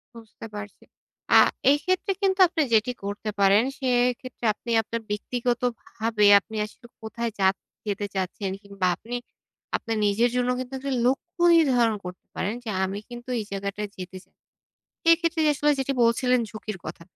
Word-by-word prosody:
বুঝতে 225 -1 -12
পারছি। 205 0 -8 0.5
আ - - +10 0.3
এক্ষেত্রে 370 +6 +1
কিন্তু 385 -1 +1
আপনি 330 -2 -1
যেটি 220 +3 +3
করতে 205 +2 -4
পারেন, 200 +2 +5 0.2
সেক্ষেত্রে 250 -1 0
আপনি 235 - -7
আপনার 230 +1 -5
ব্যক্তিগতভাবে 235 -1 -1
আপনি 220 +2 -12
আসলে 235 +3 -15
কোথায় 230 +1 -4
যাচ 190 0 +4 0.3
যেতে 205 0 -2
চাচ্ছেন 190 +1 -2
কিংবা 200 -2 -2
আপনি 240 +2 -7 0.6
আপনার 225 -1 -3
নিজের 225 +4 +3
জন্য 250 0 +1
কিন্তু 255 +1 -6
একটি 275 0 -4
লক্ষ্য 345 +7 -1 0.2
নির্ধারণ 245 -8 +3
করতে 180 0 -9
পারেন। 200 +3 -1
যে, 230 - -5
"আমি 195 +2 -2
কিন্তু 240 +1 -9
এই 215 - -3
জায়গাটায় 200 +1 -4
যেতে 185 0 -7
চাই।" - - -34 0.8
এইক্ষেত্রে 335 -1 +3
আসলে 295 +2 +2
যেটি 270 +1 0
বলছিলেন 250 +2 +3
ঝুঁকির 215 -2 -6
কথা। 155 +1 -7
230 Hz, 150 wpm, -25 LUFS, 205-250 Hz, 0.8 s, আ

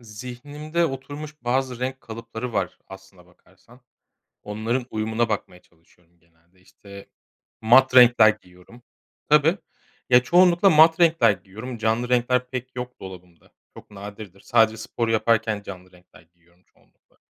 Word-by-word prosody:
zihnimde 135 +9 -5
oturmuş 145 +2 -8
bazı 125 0 -2
renk 130 +1 -4
kalıpları 115 +1 -8
var - - -3
aslına 95 -2 -15
bakarsan. 95 +7 -24 0.6
Onların 115 +4 -3
uyumuna 110 +2 -2
bakmaya 95 -4 -5
çalışıyorum 85 0 -32
genelde. 85 +2 -33
İşte, 100 +1 -15 0.5
mat 130 +3 +4
renkler 120 -3 +7
giyiyorum. 100 +3 -10 0.5
Tabii. 150 +5 +4 0.5
Ya, 125 0 +5
çoğunlukla 175 +5 +4
mat 160 0 +5
renkler 165 -8 +4
giyiyorum 105 +6 -9
canlı 115 +2 -1
renkler 125 0 0
pek 130 0 -7
yok 125 0 -7
dolabımda. 90 -2 -13 0.2
Çok - - -16
nadirdir. 100 -1 -11
Sadece 110 -1 +2
spor 115 +1 -4
yaparken 110 -1 0
canlı 95 -2 -11
renkler 90 0 -21
giyiyorum 85 +1 -32
çoğunlukla. - - -35
115 Hz, 130 wpm, -23 LUFS, 95-130 Hz, 0.6 s, renkler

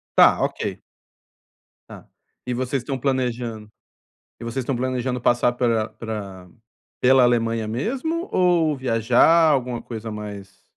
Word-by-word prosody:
Tá. - - +6
OK. - - -3 1.1
Tá. - - -12 0.4
E 125 - -2
vocês 130 +1 -2
estão 135 +1 -4
planejando 120 -5 -2 0.7
e - - -7
vocês 115 +3 -3
estão 130 -2 -1
planejando 125 0 -2
passar 120 0 +2
pela 115 -3 0
pra 105 -5 -7 0.5
pela 130 0 +5
Alemanha 115 -2 +1
mesmo 270 - -3
ou 170 -5 +2
viajar, 130 +7 +4
alguma 125 -4 -1
coisa 115 -1 -7
mais 100 -2 -9
120 Hz, 125 wpm, -22 LUFS, 115-130 Hz, 1.1 s, Tá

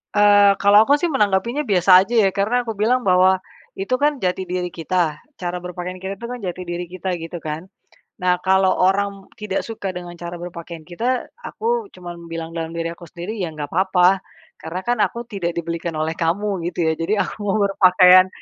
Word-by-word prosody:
Eee, 205 -1 +6
kalau 200 +1 +5
aku - - +7
sih 320 - -1
menanggapinya 235 - +1
biasa 185 - +5
aja, 230 +5 -4
ya. 195 - +4
Karena 235 +5 0
aku 225 - -3
bilang 240 +5 +1
bahwa 185 0 +5 0.4
itu 195 +6 -3
kan 295 -1 +2
jati 185 -3 -1
diri 180 -1 -3
kita, 165 -2 -1 0.2
cara 180 0 -3
berpakaian 180 +1 -6
kita 195 +1 -5
tuh 235 - -7
kan 250 - -7
jati 185 -1 -5
diri 175 +1 -4
kita, 185 0 -4
gitu 165 +1 -6
kan. 160 +3 -6 0.5
Nah, 180 0 +2
kalau 190 0 +4
orang 195 +1 +1 0.2
tidak 200 -2 -2
suka 220 -4 -5
dengan 175 -1 -7
cara 175 0 -6
berpakaian 170 -2 -8
kita, 235 +9 -2 0.2
aku 465 -2 -2
cuman 175 -2 -9
bilang 165 0 -6
dalam 165 -1 -4
diri 165 0 -2
aku 170 0 -13
sendiri 175 +6 -6
ya 175 - -1
nggak 150 -2 -7
papa. 185 +1 +3 0.4
Karena 165 +3 -5
kan 245 0 +1
aku 235 +3 0
tidak 190 -7 -4
dibelikan 170 -1 -3
oleh 155 +1 -1
kamu, 175 +2 -1
gitu 175 -1 -2
ya. 160 - +2
Jadi 195 +6 0
aku - - -1
mau 205 0 0
berpakaian 185 -1 +6
185 Hz, 190 wpm, -21 LUFS, 175-205 Hz, 0.5 s, aku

